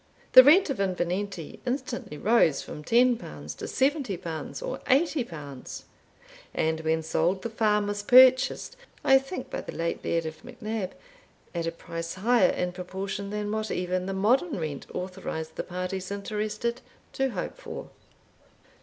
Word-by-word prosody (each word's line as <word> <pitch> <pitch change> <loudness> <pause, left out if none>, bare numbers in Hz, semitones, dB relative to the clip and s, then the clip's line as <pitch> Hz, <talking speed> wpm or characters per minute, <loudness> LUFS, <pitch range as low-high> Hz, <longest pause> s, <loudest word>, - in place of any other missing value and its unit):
The 255 - +12
rent 315 +4 +6
of 265 - -4
Invernenty 185 -2 -2
instantly 250 - -3
rose 200 -7 +3
from 150 - -8
L10 240 +4 +1
to - - -4
L70 250 - -2
or - - -4
L80; 230 - -1 0.7
and 160 0 +1
when 160 0 0
sold, 170 +4 0
the 230 - -3
farm 210 -2 +2
was 205 0 -2
purchased 255 - +6 0.3
(I 270 -1 +6
think 270 +7 -7
by - - -3
the - - -8
late 170 0 -2
Laird 165 -1 0
of 160 0 -6
MacNab) 225 -5 -4 0.6
at 170 -1 -2
a - - 0
price 165 0 -6
higher 235 +6 +4
in 180 0 -1
proportion 190 +2 -5
than 210 0 -3
what 215 0 -2
even 180 +1 -1
the 195 - -2
modern 245 - +2
rent 155 -4 -4
authorised 180 -4 -5
the - - -2
parties 185 +1 -4
interested 215 +3 -3 0.3
to 270 0 +1
hope 255 - -5
for. - - -8
200 Hz, 145 wpm, -27 LUFS, 170-245 Hz, 0.7 s, The